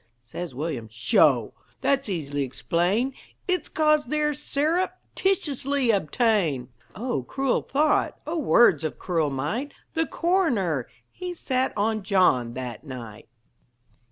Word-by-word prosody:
Says 130 +5 -7
William: 140 -5 -3
"Sho! 110 - +3 0.3
That's 275 -4 +1
easily 145 -6 -2
explained 175 - 0 0.3
It's 365 -1 0
'cause 305 -1 +3
they're 300 +3 0
syrup 310 +6 0 0.2
titiously 285 -8 +1
obtained." 180 - +1 0.3
O 215 - -2
cruel 270 - 0
thought! 295 +2 +1
O 330 +2 -2
words 235 - +5
of 155 - -3
cruel 165 -5 0
might! 155 - -3 0.2
The 325 0 0
coroner 240 - +1 0.2
He 360 -1 -6
sat 260 -4 0
on 215 +1 +1
John 180 - +2
that 125 -3 -6
night. 120 -7 -9
215 Hz, 120 wpm, -25 LUFS, -, 0.3 s, words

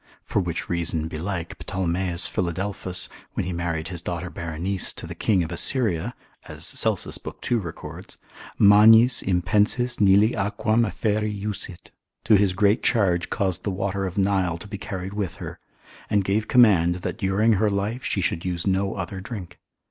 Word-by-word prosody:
For - - -1
which 85 -4 -3
reason 85 -2 0
belike 85 +1 -5
Ptolemeus 90 -1 -1
Philadelphus, 90 +1 -3 0.3
when - - -1
he 90 - -3
married 85 -1 -3
his 90 -2 -6
daughter 85 +1 -4
Berenice 85 +3 -2
to - - -7
the - - -7
king 95 -5 +1
of 80 - -6
Assyria 105 +1 +2 0.3
(as - - -5
Celsus, - - +1
lib. - - -8
2. 120 - 0
records), 85 -6 -9 0.4
magnis 110 +4 +7
impensis 105 +7 +1
Nili 100 +2 +5
aquam 110 +3 +1
afferri 105 +2 -1
jussit, 100 -4 -5 0.3
to 110 0 +3
his 100 -2 +3
great 100 +4 +2
charge 90 -7 +1
caused 95 -2 -1
the - - -1
water 95 0 -2
of 90 - -7
Nile 95 -4 +1
to 95 - -10
be 100 -1 -7
carried 95 0 -6
with 100 -4 -3
her, - - -8 0.5
and 105 -2 +2
gave 105 +3 0
command, 95 -8 +5
that - - -3
during 105 +3 +2
her 105 +1 +2
life 105 +5 -2
she 95 - -1
should 85 0 -1
use 90 -2 -3
no 95 0 0
other 95 0 -5
drink. 95 -5 -8
95 Hz, 165 wpm, -24 LUFS, 90-105 Hz, 0.5 s, magnis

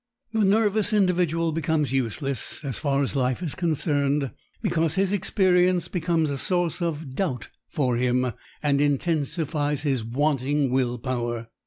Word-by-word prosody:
The 220 -1 +2
nervous 210 +1 +2
individual 175 -5 +2
becomes 155 -3 0
useless 135 +2 -2
as 135 -4 -3
far 140 -2 +1
as 135 - -2
life 130 +4 0
is 160 - -2
concerned 145 -5 0 0.3
because 165 -1 0
his 195 0 +1
experience 180 -2 +2
becomes 165 -3 0
a 140 - -3
source 175 -2 0
of 160 -5 -3
doubt 135 - -2 0.2
for 125 -5 0
him 125 0 +1 0.3
and 140 -1 +2
intensifies 145 0 0
his 135 -6 0
wanting 140 +2 0
will 125 -2 +1
power. 120 -2 -3
150 Hz, 140 wpm, -25 LUFS, 135-170 Hz, 0.3 s, The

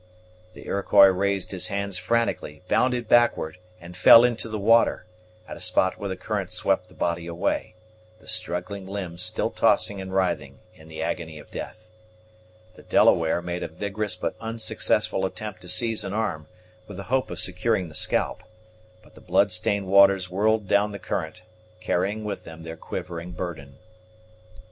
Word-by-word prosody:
The - - -12
Iroquois 100 0 +5
raised 100 +1 -1
his 95 0 0
hands 100 -2 -2
frantically, 95 -8 -1
bounded 125 -2 +1
backward, 115 -9 +2 0.2
and 85 +1 -11
fell 115 +5 +8
into 120 -2 0
the 110 - -3
water, 115 -1 +3 0.4
at - - -7
a - - -11
spot 95 - +2
where 100 - -4
the 95 - -3
current - - -3
swept - - 0
the - - -20
body 85 0 -2
away, 90 +5 -2 0.4
the - - -21
struggling 95 +2 -3
limbs 95 -3 -4
still - - -1
tossing 100 -1 +2
and 95 0 -7
writhing 95 -2 -1 0.2
in 80 - -17
the 80 0 -6
agony 80 -2 -4
of 75 - -14
death. 110 0 -8 0.9
The - - -15
Delaware 85 +1 +3
made 90 0 -4
a - - -3
vigorous 100 -1 -3
but - - -3
unsuccessful 115 -3 0
attempt 95 0 -5
to 90 - -10
seize 115 -2 +2
an 95 - -4
arm, 95 -9 -2 0.4
with 100 - -9
the 100 - -6
hope 130 -1 +1
of - - -6
securing 95 +1 -1
the 80 - -13
scalp; 90 - 0 0.6
but - - -21
the - - -16
bloodstained 95 +2 +1
waters 95 -1 +4
whirled 105 +2 +1
down 100 +1 +2
the - - -5
current, 90 -2 -5 0.4
carrying 105 +3 -1
with 100 -1 -5
them 80 0 -11
their 80 0 -7
quivering 85 +1 -7
burden. 80 -6 -7
95 Hz, 165 wpm, -25 LUFS, 90-105 Hz, 0.9 s, fell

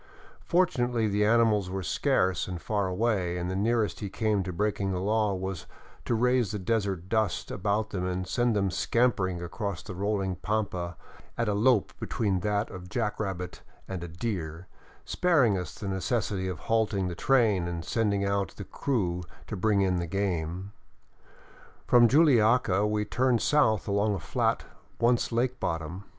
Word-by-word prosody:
Fortunately 125 -10 +2
the 105 0 +1
animals 110 -3 +3
were 95 0 -3
scarce 90 +2 +1
and 90 -2 -5
far 100 +1 -1
away, 95 -2 0
and 90 +1 -3
the - - -2
near 115 +3 +2
est 95 -6 -4
he 100 - -4
came 110 -1 0
to 95 0 -4
breaking 100 +1 -1
the 90 - -1
law 105 +1 +1
was 95 -2 -5 0.4
to 120 - +1
raise 125 -1 +2
the 105 - -3
desert 95 -3 -1
dust 110 -3 0
about 105 +3 -1
them 95 -3 -2
and 90 0 -2
send 120 +3 +1
them 100 -2 +1
scampering 95 -6 +1
across 95 +1 -4
the - - -7
rolling 95 -1 -1
pampa 90 -4 -2 0.4
at 115 - 0
a 105 - +1
lope 110 +1 +3
between 100 -4 -1
that 105 +3 -1
of 90 -1 -9
jack 105 -2 -2
rabbit 95 -4 -4 0.3
and 95 -3 -5
a - - -5
deer, 85 -2 -4 0.4
sparing 140 - +3
us 90 -3 -4
the 100 - -6
necessity 95 0 -1
of 90 -5 -5
halting 110 -4 +1
the 90 - -3
train 105 -4 +2
and 85 -1 -4
sending 100 -3 0
out 100 -3 -1
the 100 - -7
crew 95 -7 -1 0.2
to 105 - -5
bring 105 +1 +2
in 95 -2 +2
the 85 -1 -2
game. 95 0 -2 1.1
From 120 -1 +6
Juliaca 115 - +4
we 105 0 0
turned 125 +2 +1
south 140 -8 +3
along 100 +1 +1
a - - -4
flat - - 0 0.4
once 120 +1 +2
lake 125 +2 0
bottom. 85 +4 -3
100 Hz, 170 wpm, -28 LUFS, 90-110 Hz, 1.1 s, From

